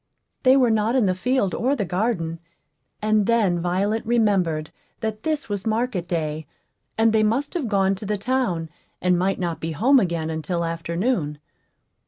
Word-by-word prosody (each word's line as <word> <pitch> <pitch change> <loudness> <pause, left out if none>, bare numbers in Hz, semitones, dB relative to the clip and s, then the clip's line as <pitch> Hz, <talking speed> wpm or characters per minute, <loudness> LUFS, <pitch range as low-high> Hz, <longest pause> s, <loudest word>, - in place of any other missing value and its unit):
They 260 0 +5
were 250 -3 +4
not 220 +2 +1
in 250 -5 +3
the 185 - +2
field 205 0 0
or 265 +4 +1
the 205 - -2
garden; 180 -4 -1 0.6
and 215 -1 +2
then 210 -7 +2
Violet 195 +6 0
remembered 195 -9 +1 0.3
that 220 -1 -3
this 310 -2 -2
was 205 -1 -3
market 220 -5 -1
day, 155 -3 -2 0.5
and 225 0 +4
they 220 - +4
must 235 +7 0
have 330 -9 -2
gone 195 -2 +2
to 195 +1 -6
the 210 0 0
town, 200 -8 -1 0.3
and 180 0 +2
might 185 +2 +1
not 170 -3 -3
be 165 0 -3
home 260 - +4
again 170 -6 -1
until 165 +2 -2
afternoon. 165 - -1
200 Hz, 170 wpm, -23 LUFS, 170-230 Hz, 0.6 s, They